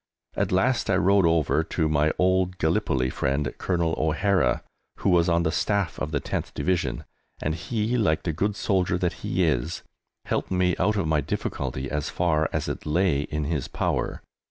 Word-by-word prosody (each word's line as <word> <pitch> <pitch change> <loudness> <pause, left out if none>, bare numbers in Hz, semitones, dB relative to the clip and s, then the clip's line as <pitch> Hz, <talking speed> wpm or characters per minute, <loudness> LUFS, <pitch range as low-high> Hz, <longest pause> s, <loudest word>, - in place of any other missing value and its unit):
At - - 0
last 120 +7 +2
I 95 - +4
rode 95 -1 +4
over 80 -1 +2
to 80 0 -1
my 75 0 +2
old 95 0 +2
Gallipoli 65 -5 +1
friend, 70 0 -1
Colonel 85 -3 0
O'Hara, 85 +4 +1 0.3
who - - +1
was 85 0 +4
on 85 0 +2
the 80 - +1
Staff 100 -1 0
of 75 - -2
the 75 -2 -1
10th - - -4
Division, 85 -10 -1 0.4
and 75 - -1
he, 110 +8 -1
like 80 -8 +1
the 80 - -1
good 100 +6 -1
soldier 95 -4 +1
that 90 -1 0
he - - +1
is, 65 +8 -1 0.4
helped - - -1
me 90 -1 +2
out 105 - +2
of 100 -6 0
my 75 -1 +2
difficulty 65 -1 -3
as 75 +1 -2
far 80 -3 +1
as - - -2
it - - -5
lay 85 -1 +2
in 75 +1 -3
his 75 -2 -2
power. - - -2
85 Hz, 180 wpm, -25 LUFS, 75-95 Hz, 0.4 s, I